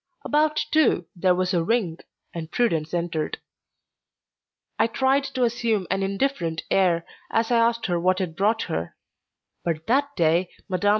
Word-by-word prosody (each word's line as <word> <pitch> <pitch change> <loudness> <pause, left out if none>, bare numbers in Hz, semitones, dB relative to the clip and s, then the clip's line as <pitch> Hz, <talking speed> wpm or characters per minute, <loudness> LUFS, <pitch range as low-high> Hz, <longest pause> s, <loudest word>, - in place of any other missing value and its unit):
About 305 +1 +2
two 300 - +3
there 180 0 +3
was 185 +1 0
a 170 -2 +2
ring, 180 -4 0 0.3
and 160 -2 -6
Prudence 165 -11 0
entered. 170 -3 -2 1.4
I - - +4
tried 265 +4 +1
to 260 -2 -2
assume 230 -4 0
an 190 +1 +1
indifferent 195 -5 -1
air 175 -3 +3 0.2
as 225 +1 0
I 240 - +4
asked 230 0 +2
her 175 -2 0
what 185 +2 +2
had 180 -4 -3
brought 215 +4 +1
her; 85 +1 -4 0.7
but 160 -2 -2
that 280 +4 +1
day 170 +1 +2 0.2
Mme. 190 +1 -1
190 Hz, 155 wpm, -24 LUFS, 170-235 Hz, 1.4 s, I